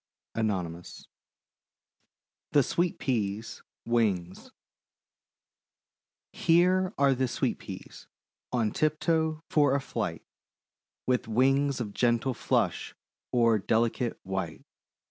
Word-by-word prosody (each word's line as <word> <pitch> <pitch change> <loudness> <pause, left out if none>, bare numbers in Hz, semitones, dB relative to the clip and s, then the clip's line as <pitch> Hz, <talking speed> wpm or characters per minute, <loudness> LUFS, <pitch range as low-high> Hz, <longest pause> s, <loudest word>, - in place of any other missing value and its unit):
ANON. 90 -7 -1 1.7
THE 145 - +6
SWEET 175 +6 0
PEAS' 110 -4 -2 0.2
WINGS 100 -7 0 1.8
Here 180 +3 +3
are 135 -2 +3
Sweet 125 - -1
Peas, - - -10 0.4
on 115 -4 +1
tiptoe 155 +1 0
for 145 -3 +4
a - - +2
flight; 135 - -4 0.8
With 125 -2 +1
wings 135 +4 +2
of 105 -4 -4
gentle 120 +3 +1
flush - - -1 0.4
o'er 115 -3 +4
delicate 115 +3 0
white. 95 0 -4
125 Hz, 85 wpm, -28 LUFS, 110-145 Hz, 1.8 s, THE